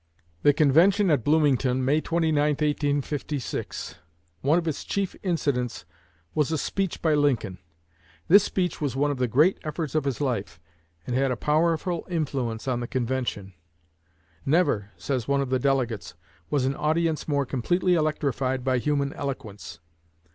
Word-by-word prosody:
The 145 - +6
convention 165 +9 +4
met 170 - +4
at - - -15
Bloomington, 135 -4 +2
May 150 +4 +2
29, 165 -2 0 0.2
1856. 145 -1 -2 0.4
One 150 +5 +3
of 170 -1 -1
its 155 - -2
chief 200 -2 -2
incidents 140 - -1 0.5
was 150 0 +1
a 160 - +1
speech 195 +3 -2
by 160 -2 +3
Lincoln. 130 -11 +1 0.7
This 200 +3 +7
speech 180 -5 -2
was 140 -4 -1
one 145 +2 +1
of 140 - -3
the 125 - +2
great 150 - +3
efforts 155 -2 -4
of 155 -2 0
his 135 -4 -2
life, 115 - -2 0.5
and 125 - -2
had 135 +1 +2
a 125 - -1
powerful 165 - 0
influence 135 -9 -2
on 125 -2 0
the 120 - -4
convention. 120 -6 -2 0.9
"Never," 140 - +1
says 130 -5 -2
one 140 0 +2
of 135 -2 -2
the 130 - +2
delegates, 120 -10 -1 0.3
"was 140 -3 +1
an 135 +1 0
audience 160 +1 0
more 140 -2 +1
completely 175 +9 +1
electrified 140 -5 0
by 130 -1 +1
human 140 +1 0
eloquence. 105 -10 -6
140 Hz, 155 wpm, -26 LUFS, 130-155 Hz, 0.9 s, This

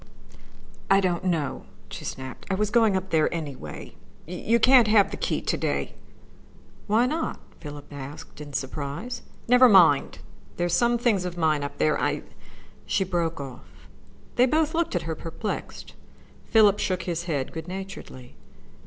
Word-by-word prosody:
"I 195 - +6
don't 180 -3 0
know," 165 -6 -1 0.2
she - - -8
snapped. 130 -1 -7
"I 190 - +1
was 210 +1 -1
going 225 -4 +4
up 190 0 -3
there, 155 -2 +3
anyway. 140 - -6 0.3
You 195 +7 0
can't 250 -1 +6
have 210 -2 +4
the - - -3
key - - -2
to - - 0
day." - - -2 0.9
"Why 220 +3 +3
not?" 315 +5 -2 0.2
Philip 145 -2 -9
asked 145 +2 -9
in 145 -1 -9
surprise. 145 - -4 0.3
"Never 250 +1 +7
mind. 170 -9 +5 0.4
There 175 - 0
are - - -1
some 235 +6 +3
things 230 -6 +1
of 180 -1 -5
mine 155 -3 +2
up 145 - -6
there. 75 - +1
I - - 0 0.3
" - - -24
She - - +1
broke 170 -4 -1
off. 135 -3 -10 0.5
They 250 +1 +6
both 310 +3 +1
looked 335 - 0
at 175 - 0
her, 165 - -3
perplexed. 165 +7 -6 0.5
Philip 210 -2 +5
shook 185 -2 -1
his 170 -1 -3
head 145 -6 -2
good 160 0 -6
naturedly. 185 - -8
180 Hz, 160 wpm, -25 LUFS, 150-215 Hz, 0.9 s, Never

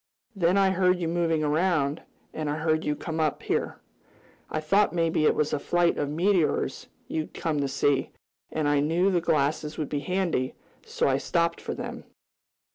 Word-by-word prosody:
Then 180 0 +2
I 195 -1 +4
heard 185 -1 +2
you 170 - -1
moving 165 -2 +1
around, 150 -1 +1 0.3
and 155 -2 -3
I 145 - -1
heard 155 0 0
you 150 - 0
come 160 +1 -5
up 155 -2 0
here. - - -1 0.7
I 155 - -2
thought 185 +7 +2
maybe 165 -2 +1
it - - +3
was 150 - 0
a 150 - +1
flight 175 +3 +1
of 145 - -1
meteors 170 +1 +1 0.2
you'd 155 -1 -4
come 155 -3 -1
to 140 - 0
see, 135 0 +1 0.4
and 155 -2 -1
I 145 0 +3
knew 170 +6 +2
the 175 -2 +2
glasses 150 -1 0
would 155 - -3
be 145 - -1
handy, 175 -6 -1 0.3
so - - -1
I 135 0 +2
stopped 170 +3 0
for - - -4
them. - - -6
160 Hz, 185 wpm, -26 LUFS, 150-175 Hz, 0.7 s, I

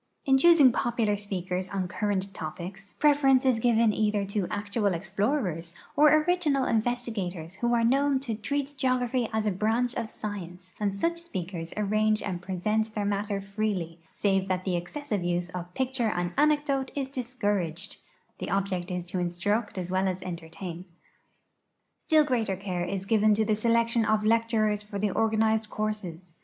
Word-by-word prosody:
In 270 -1 +4
choosing 315 -4 +7
popular 230 -3 0
speakers 185 -2 -3
on 190 -2 -2
current 195 +1 -2
topics, 185 +4 -7
{U'eference 275 -3 +4
is 255 -3 +3
given 230 -2 +3
either 210 -2 +1
to 200 -2 -2
actual 205 -1 -1
explorers 185 - -1 0.2
or 300 +1 +6
original 310 -6 +1
investigators 215 -8 -2
who 240 0 +2
are 230 - +2
known 275 +3 +3
to 250 -5 -3
treat 280 +6 -2
geography 255 -2 +1
as 220 -1 0
a 210 - +2
branch 225 +6 0
of 230 -3 -3
science, 185 -4 -7
and 205 -1 +1
such 335 +13 -1
sj)eakers 175 -3 -4
arrange 215 +1 +1
and 180 -3 -3
l)resent 215 +4 -1
their 205 -1 -1
matter 205 0 -1
freel}% 195 -4 -3
save 195 -2 +1
that 185 -1 -1
the 185 -2 0
excessive 205 - -3
use 175 0 -1
of 180 -1 -6
j)icture 260 -4 0
and 175 0 -1
anecdote 290 -3 +2
is 275 -2 -1
discouraged 205 - -2 0.2
— 475 - -41
the - - -4
object 190 -2 -1
is 180 -1 -3
to 180 +1 -3
instruct 195 +6 -1
as 180 -1 -4
well 190 +1 +1
as 185 0 -3
entertain. 175 0 -7 1.1
Still 310 -2 +4
greater 235 -8 0
care 185 -2 -3
is 190 +1 -3
given 215 0 +4
to 220 +1 +1
the 215 0 +2
selection 230 +1 +2
of 215 -1 +2
lecturers 220 -2 +2
for 210 0 -7
the 205 0 0
organized 220 0 +1
courses. 190 -6 -4
210 Hz, 165 wpm, -28 LUFS, 185-235 Hz, 1.1 s, choosing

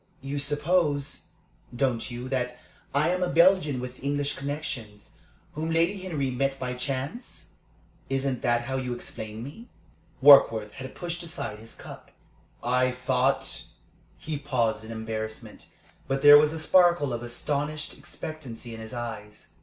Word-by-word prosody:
You 140 +2 -3
suppose, 145 0 0 0.5
don't 125 -2 0
you, 120 +1 -6
that 125 -2 -1 0.3
I 145 +4 +2
am 180 +1 0
a 180 - +1
Belgian 170 -5 +4
with 125 +1 -7
English 145 +1 0
connections, 135 -7 -5 0.4
whom 160 +2 -3
Lady 165 +4 +2
Henry 155 -8 -2
met 135 +2 0
by 125 -1 -3
chance? 135 - -5 0.6
Isn't 135 -2 -1
that 120 0 +2
how 130 +2 -2
you 125 -2 -2
explain 110 -2 -6
me?" 155 - -10 0.5
Warkworth 115 -7 +7
had 130 +4 -9
pushed 175 0 -4
aside 140 -10 -5
his 115 +1 -13
cup. - - -11 0.5
"I 125 +1 +3
thought 130 +1 0 0.3
" - - -33
He 155 -2 -4
paused 120 -6 0
in 110 - -8
embarrassment, 110 -1 -6 0.4
but 135 +1 -1
there 145 0 +11
was 150 0 +3
a 160 - -4
sparkle 170 -4 +4
of 120 - -3
astonished 145 +5 -3
expectancy 125 -7 -8
in 115 - -8
his 110 +3 -8
eyes. 105 -5 -7
135 Hz, 145 wpm, -27 LUFS, 120-150 Hz, 0.6 s, there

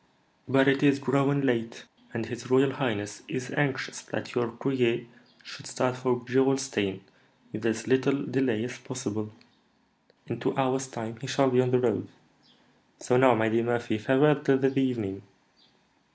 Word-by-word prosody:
But 135 +1 +4
it 135 0 +3
is 140 -1 +5
growing 140 +1 +1
late, 120 -3 -1 0.3
and 115 -1 -4
his 120 +2 -8
royal 135 +1 +4
highness 110 -7 -3
is 130 0 -5
anxious 145 -3 -1
that - - -6
your 120 -2 0
courier 120 -1 0 0.4
should - - -11
start 125 -1 -1
for 125 -1 -1
Gerolstein 130 -7 +1 0.5
with 105 +1 -6
as 115 0 -2
little 135 +2 +2
delay 125 -5 0
as 125 +1 -6
possible." 110 -4 -5 0.9
"In - - -5
two - - -2
hours' 130 0 0
time 115 -3 -7
he 135 - -7
shall 135 +1 +2
be 125 0 +4
on 125 - +1
the 125 - +3
road. 120 -5 0 0.9
So 125 - 0
now, 125 -1 +6
my 110 0 +1
dear 115 +1 +1
Murphy, 120 -2 -1
farewell 135 +6 +4
till 135 -3 +3
the 135 0 +1
evening." 110 -7 -1
125 Hz, 160 wpm, -27 LUFS, 115-135 Hz, 0.9 s, now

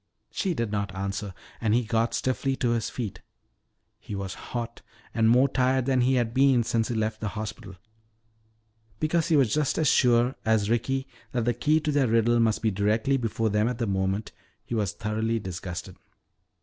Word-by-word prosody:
She 185 -4 -1
did 115 -5 -2
not 100 -2 -2
answer, 100 +1 -3 0.3
and 110 -1 +2
he 125 - +2
got 115 +1 0
stiffly 130 +3 0
to 120 -2 0
his 115 -2 0
feet. 115 -7 -5 0.8
He 105 - -7
was 95 -1 -4
hot 120 +2 -6 0.3
and 115 -1 +3
more 125 +4 +5
tired 130 -1 +1
than 130 -1 +2
he 130 +2 +3
had 120 -2 0
been 130 -2 +4
since 115 0 0
he 120 - -3
had - - 0
left 110 0 -2
the 110 - -2
hospital. 105 -2 -6 1.2
Because 160 +1 +1
he 165 - +3
was 130 -6 +3
just 150 -2 +1
as 155 - +2
sure 125 -1 +4
as 110 -1 +2
Ricky 130 +4 0 0.3
that 120 -3 0
the 120 - +2
key 150 +7 +2
to 150 - -1
their 140 -3 +2
riddle 115 +1 +3
must 115 -1 +1
be 110 - +2
directly 105 +7 +1
before 115 -3 -1
them 105 +2 +2
at 125 -1 -2
that 120 - -1
moment, 95 +2 -1 0.3
he - - -6
was 105 -4 0
thoroughly 110 +1 -1
disgusted. 95 -2 -6
115 Hz, 190 wpm, -26 LUFS, 105-125 Hz, 1.2 s, more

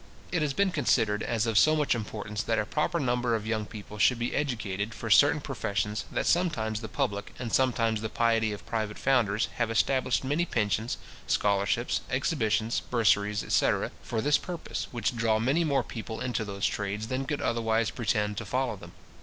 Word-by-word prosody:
It 175 - +1
has 150 -2 0
been 200 -1 +2
considered 110 -8 +2
as 115 -1 0
of 110 -2 +3
so 155 0 +5
much 150 -2 +2
importance 105 -2 -4
that 115 - 0
a 105 - +1
proper 150 +8 0
number 125 -3 +1
of 110 -1 -3
young 110 -1 -1
people 105 -1 -9
should 125 +4 +4
be 120 +1 -2
educated 110 -6 -2
for 115 - -5
certain 145 +7 +6
professions, 105 -6 -2
that - - -1
sometimes 110 -12 +1
the 110 - -5
public, 100 -1 -3
and 120 -3 -5
sometimes 115 -4 +2
the 110 - -3
piety 115 -1 +2
of 100 -5 -7
private 110 -2 -3
founders, 115 -6 +2
have 120 -2 +1
established 130 +3 +1
many 145 +6 +1
pensions, 110 - -1 0.3
scholarships, 100 -1 +1
exhibitions, 110 +1 0
bursaries, 105 -3 +2
etc. - - +1
for 115 -2 -2
this 145 +3 +3
purpose, 175 +1 -5
which 120 0 -2
draw 115 -2 +2
many 135 +10 +2
more 140 -5 +1
people 110 -1 -6
into 120 -3 -2
those 100 -2 -3
trades 105 +1 -2
than 130 +1 -1
could 145 +2 -2
otherwise 115 -1 +1
pretend 105 -3 -1
to 115 - -3
follow 125 +2 -1
them. - - -12
115 Hz, 185 wpm, -28 LUFS, 105-130 Hz, 0.3 s, certain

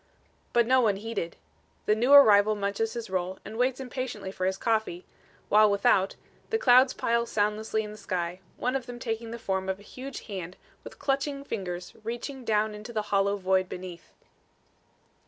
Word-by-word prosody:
But 235 -1 +4
no 255 +2 +4
one 215 -4 +3
heeded. 200 -5 -4 0.5
The 210 - +4
new 240 +5 +1
arrival 215 -7 +8
munches 205 +2 -1
his 235 -5 -6
roll 185 0 -2
and 215 - -8
waits 250 +2 +1
impatiently 250 -6 -5
for 185 -1 -2
his 190 0 -1
coffee, 220 -5 -1 0.4
while 215 0 +6
without, 200 -1 +3 0.3
the 445 - +1
clouds 255 - +6
pile 235 0 0
soundlessly 215 +1 0
in 210 - -7
the 210 - -10
sky, 175 0 -3 0.2
one 250 +2 -1
of 260 -3 -3
them 245 0 -7
taking 230 -1 -4
the 235 - -5
form 190 -3 -2
of 190 0 -2
a - - -15
huge 260 +4 -8
hand 185 -4 -7 0.3
with - - -11
clutching 275 0 -1
fingers 180 -8 -5
reaching 240 +4 -5
down 215 -1 +1
into 210 +3 -8
the 220 -2 -1
hollow 200 +1 +2
void 185 -1 +1
beneath. 180 -2 -8
215 Hz, 175 wpm, -28 LUFS, 190-240 Hz, 0.5 s, arrival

